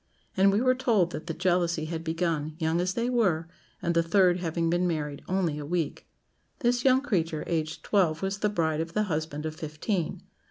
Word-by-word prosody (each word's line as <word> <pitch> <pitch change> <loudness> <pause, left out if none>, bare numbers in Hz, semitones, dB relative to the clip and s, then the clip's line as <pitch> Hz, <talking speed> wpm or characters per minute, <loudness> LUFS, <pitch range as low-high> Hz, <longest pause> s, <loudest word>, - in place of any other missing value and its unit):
And 195 +1 +5
we 205 +3 +2
were 255 0 +4
told 230 -9 +2
that 155 - -6
the 165 - -2
jealousy 175 -2 +1
had 165 0 -4
begun, 160 -2 -1
young 165 +1 +1
as 185 +1 -1
they 235 0 0
were, 190 -10 +1 0.4
and 170 - +1
the 170 - +4
third 180 +1 +3
having 165 -1 -1
been 175 +2 +2
married 150 -4 -3
only 180 -5 0
a - - -5
week. 165 0 -2 0.5
This 245 -1 +2
young 260 0 +5
creature, 165 - -1
aged 160 -2 -2
twelve, 175 -5 +1
was 195 +1 -2
the 210 - +1
bride 160 -5 0
of 165 +1 -5
the 210 - +2
husband 155 -4 -3
of 155 0 -4
fifteen. 165 +4 -3
170 Hz, 200 wpm, -28 LUFS, 160-195 Hz, 0.5 s, And